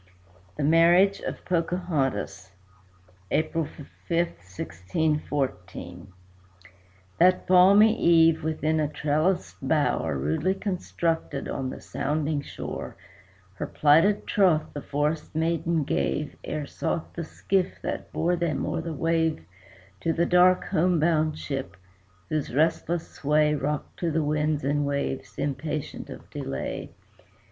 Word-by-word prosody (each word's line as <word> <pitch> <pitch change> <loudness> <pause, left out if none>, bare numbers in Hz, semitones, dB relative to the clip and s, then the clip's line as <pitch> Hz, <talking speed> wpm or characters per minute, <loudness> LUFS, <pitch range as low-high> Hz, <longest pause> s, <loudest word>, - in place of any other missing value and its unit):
THE 150 - -1
MARRIAGE 170 +6 +5
OF - - -6
POCAHONTAS 165 - -1 0.8
[April 160 +1 0
5, 155 - -13 0.3
1614] 95 - -2 1.1
That 180 +2 +4
balmy 200 +4 +6
eve, 165 -1 +5
within 155 0 0
a 150 - +1
trellised 150 - 0
bower, - - +1
Rudely 80 - 0
constructed 170 -6 -2
on 130 -1 -3
the - - -7
sounding 150 0 -2
shore, - - -6 0.6
Her 95 - -5
plighted 165 +8 +4
troth 180 -6 +2
the 145 - -5
forest 150 +3 -2
maiden 165 0 +1
gave 145 +1 -1
Ere 150 -1 -3
sought 160 +3 -3
the 170 - -4
skiff 185 +3 -1
that - - -4
bore 175 +2 +1
them 165 -5 -1
o'er - - -2
the 165 0 -5
wave 160 - 0 0.5
To 165 - 0
the 170 +1 +1
dark 180 +1 +5
home 175 +1 +2
bound 155 -1 +2
ship, 135 - -5 0.5
whose 150 -5 -2
restless 165 +2 +1
sway 150 +1 +2
Rocked 150 0 -3
to 170 - 0
the 160 0 0
winds 150 0 0
and 145 +2 +1
waves, 140 -1 -3
impatient 150 +1 -3
of - - -10
delay. 70 0 -4
155 Hz, 120 wpm, -26 LUFS, 145-170 Hz, 1.1 s, balmy